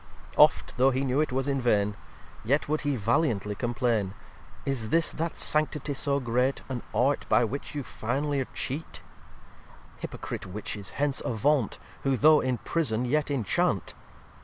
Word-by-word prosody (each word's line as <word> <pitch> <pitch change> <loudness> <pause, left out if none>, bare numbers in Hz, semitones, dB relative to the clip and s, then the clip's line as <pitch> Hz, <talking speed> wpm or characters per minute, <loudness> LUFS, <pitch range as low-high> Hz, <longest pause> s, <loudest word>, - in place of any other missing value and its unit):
xxvi - - -17
Oft, - - +5
though 130 +2 +5
he 135 +1 0
knew 135 +3 +2
it 155 - -1
was 135 +2 -1
in 135 -1 0
vain, 105 -4 +2 0.5
Yet 140 +6 +1
would 155 +1 0
he 145 -2 0
valiantly 115 -2 +1
complain. 115 -4 -1 0.5
"Is 120 -5 -1
this 165 +4 +3
that 165 +1 -3
Sanctity 150 -1 +1
so 140 0 0
great, 125 +2 0
An 125 -3 -3
Art 135 +4 +1
by - - +5
which 135 +6 -4
you 145 - -2
finly'r 135 +4 -2
cheat 145 +5 -5 0.9
Hypocrite - - -6
Witches, 100 0 -5
hence 140 -1 +2
avant, 125 0 +1 0.2
Who 135 -1 +1
though 155 +3 +6
in 130 -1 0
prison 125 -5 0
yet 150 +4 +1
inchant! 130 -8 0
130 Hz, 155 wpm, -28 LUFS, 115-145 Hz, 0.9 s, though